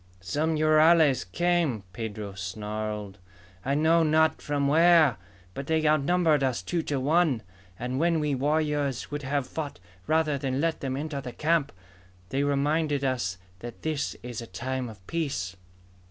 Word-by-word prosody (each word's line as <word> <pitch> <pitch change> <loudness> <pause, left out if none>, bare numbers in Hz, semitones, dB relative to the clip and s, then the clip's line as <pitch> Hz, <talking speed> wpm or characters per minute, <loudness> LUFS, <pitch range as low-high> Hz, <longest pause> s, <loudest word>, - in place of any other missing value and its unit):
"Some 150 - -1
rurales 155 -2 +5
came!" 170 - +1
Pedro 105 -1 -5
snarled. 105 +2 -5 0.4
"I 140 +2 0
know 160 +3 +4
not 160 0 +3
from 145 -1 0
where! 160 - +5 0.4
But 140 +6 -6
they 160 -1 +2
outnumbered 155 0 +3
us 130 -3 0
two 175 -2 -1
to 145 -3 -2
one. 145 -4 +2 0.3
And 125 +2 -3
when 165 0 +2
we 150 -1 0
warriors 145 -1 0
would 145 0 -3
have 140 0 -1
fought 150 +1 -5 0.3
rather 155 -3 +2
than 130 0 -1
let 165 +1 0
them 135 -1 -3
enter 145 -1 -4
the 125 -2 -7
camp, 155 -2 +1 0.6
they 135 +4 0
reminded 145 +1 +1
us 120 -9 -1 0.2
that 120 +2 -9
this 155 -2 -2
is 120 -1 -5
a 115 - -8
time 125 +6 -4
of 105 -4 -14
peace! 135 - -3
145 Hz, 155 wpm, -27 LUFS, 125-155 Hz, 0.6 s, rurales